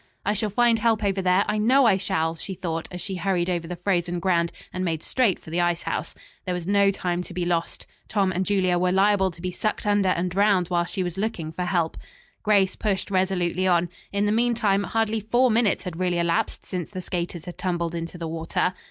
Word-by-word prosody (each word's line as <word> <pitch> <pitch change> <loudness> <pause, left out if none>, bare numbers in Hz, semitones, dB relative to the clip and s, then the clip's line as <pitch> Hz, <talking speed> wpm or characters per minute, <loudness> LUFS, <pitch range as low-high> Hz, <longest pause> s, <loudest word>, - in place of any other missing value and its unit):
"I 205 - +2
shall 215 +1 -1
find 230 +2 +3
help 220 -1 +2
over 195 -1 +1
there, 185 +2 +3
I 210 0 0
know 255 +5 +4
I 200 -5 +5
shall," 165 -4 0
she 190 +3 -6
thought 165 -3 -3
as 180 - -7
she 190 -2 -3
hurried 180 -1 0
over 170 -2 -2
the 180 - -4
frozen 175 -1 -1
ground 170 -2 +1 0.2
and 185 - -2
made 160 -3 -2
straight 240 -8 +2
for 160 - -13
the 175 +1 +1
ice 175 -1 0
house. - - -3 0.3
There 180 -2 -1
was 175 -2 -4
no 200 +1 +4
time 180 -2 -1
to 180 - -8
be 180 -1 -1
lost. 170 -1 -2 0.2
Tom 195 -3 +1
and 185 +1 0
Julia 185 -3 +1
were 180 0 +2
liable 190 0 +3
to 170 -1 -12
be 180 - -2
sucked 215 +5 -2
under 205 -2 +3
and 180 0 0
drowned 195 -2 +2
while 175 -1 +1
she 185 +1 -2
was 175 +1 -4
looking 185 -7 -2
for 180 +2 -3
help. 175 -3 0 0.4
Grace 200 -3 +3
pushed 200 -2 -1
resolutely 185 -1 +1
on. 175 -1 +2 0.2
In 200 +1 0
the 205 - +2
meantime 220 -3 +2
hardly 225 0 0
four 240 +4 +2
minutes 220 -2 +2
had 175 -2 -6
really 180 -1 +1
elapsed 170 0 0
since 180 -3 -4
the 185 - -6
skaters 175 -2 -4
had 175 - -9
tumbled 170 -2 -1
into 170 +1 -5
the 165 -1 -4
water. 165 +3 -1
185 Hz, 225 wpm, -24 LUFS, 175-205 Hz, 0.4 s, I